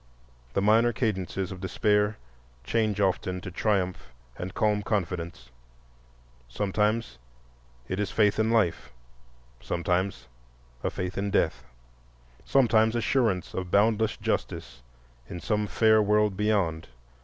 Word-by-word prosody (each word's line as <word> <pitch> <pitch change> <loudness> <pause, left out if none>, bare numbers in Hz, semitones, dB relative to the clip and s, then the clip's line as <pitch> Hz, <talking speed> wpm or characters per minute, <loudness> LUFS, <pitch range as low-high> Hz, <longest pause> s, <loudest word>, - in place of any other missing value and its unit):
The 100 - 0
minor 115 +3 +4
cadences 95 -5 -2
of 95 -1 -8
despair 105 +2 +1 0.5
change 110 - 0
often 95 -1 0
to 95 - -7
triumph 95 - -1 0.3
and 90 +1 -5
calm 105 +1 +1
confidence. 90 - -3 1.0
Sometimes 105 - -1 0.7
it 95 +4 -3
is 105 -2 -1
faith 105 -1 +2
in 110 0 +2
life, 100 - +1 0.7
sometimes 90 +3 -2 0.6
a - - +1
faith 90 +1 -4
in 100 +1 -1
death, 65 -9 0 0.8
sometimes 115 -4 +3
assurance 115 - 0
of 90 -1 -4
boundless 110 +2 +2
justice - - -3 0.5
in 90 - -6
some 105 +2 -1
fair 110 +3 +4
world 105 -1 +2
beyond. 95 -6 0
105 Hz, 115 wpm, -27 LUFS, 90-110 Hz, 1.0 s, minor